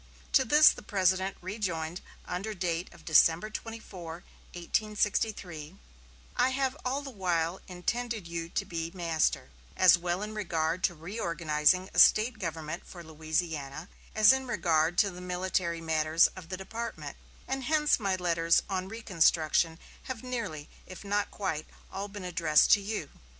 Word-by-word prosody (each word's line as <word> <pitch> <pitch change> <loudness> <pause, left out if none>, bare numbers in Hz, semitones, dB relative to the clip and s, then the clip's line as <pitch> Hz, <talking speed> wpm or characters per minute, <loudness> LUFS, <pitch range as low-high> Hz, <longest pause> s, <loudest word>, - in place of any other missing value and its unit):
To 270 - +5
this 300 +5 +7
the - - -4
President 190 -1 +1
rejoined 180 -4 -3 0.2
under 195 +4 -4
date 175 -1 -2
of - - -17
December 165 +5 +4
24, 185 -7 -8 0.3
1863: 195 -3 -2 0.6
"I 255 - +3
have 265 0 -1
all 270 +3 -1
the 275 - -7
while 175 -4 -1
intended 220 +3 -3
you 170 0 -5
to - - -2
be 165 -1 -4
master, 160 - 0 0.3
as 185 -1 +7
well 175 +3 -2
in 215 +1 -5
regard 170 -4 -1
to 175 - -1
reorganizing 170 -1 0
a - - +1
State 220 +1 +5
government 165 -2 -4
for 175 -2 -10
Louisiana 155 -1 -3 0.3
as 215 +3 +7
in 265 0 -2
regard 165 -6 +1
to 200 0 +4
the 180 0 -10
military 180 -2 -2
matters 160 0 +3
of 180 -3 -11
the 185 - -4
department, 225 +5 -6 0.3
and 265 -1 -3
hence 300 0 +3
my 195 -3 0
letters 170 -2 +2
on 190 -1 -2
reconstruction 165 -6 +1 0.3
have 255 -3 -6
nearly, 230 -13 -4 0.2
if 185 - -10
not 205 +1 0
quite, 160 -7 -3 0.2
all 195 +1 -4
been 205 -2 -8
addressed 165 -4 +3
to 205 - +6
you. 200 -7 -4
180 Hz, 150 wpm, -29 LUFS, 165-210 Hz, 0.6 s, this